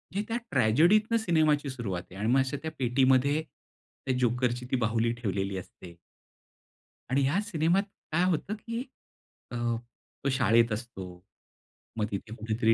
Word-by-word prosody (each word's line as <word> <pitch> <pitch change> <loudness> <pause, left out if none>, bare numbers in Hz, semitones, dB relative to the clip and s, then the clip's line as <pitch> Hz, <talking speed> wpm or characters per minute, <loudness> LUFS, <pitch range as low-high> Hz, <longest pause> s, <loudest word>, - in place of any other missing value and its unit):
हे 200 - +1
त्या 230 - -1
ट्रॅजेडीतनं 170 - +4
सिनेमाची 155 -8 +2
सुरुवात 110 -9 -3
आहे - - -11
आणि 105 - -1
मग 135 - +5
अशा 130 +1 0
त्या 160 - -3
पेटीमध्ये 130 +3 +3
त्या 130 -4 -8
जोकरची 125 0 +1
ती - - +3
बाहुली 115 -1 +1
ठेवलेली 100 -4 -2
असते. 90 -1 -10 1.2
आणि 135 +2 +3
ह्या 145 +8 +2
सिनेमात 180 -2 +1 0.3
काय 165 +3 +2
होतं, 175 +5 -1
की 230 +2 -5 0.7
अ, - - -5 0.7
तो 140 - +1
शाळेत 115 -2 +4
असतो, 110 -3 -5 0.9
मग 110 - +1
तिथे 105 +2 -5
कुठेतरी 110 +1 +1
130 Hz, 140 wpm, -29 LUFS, 115-155 Hz, 1.2 s, मग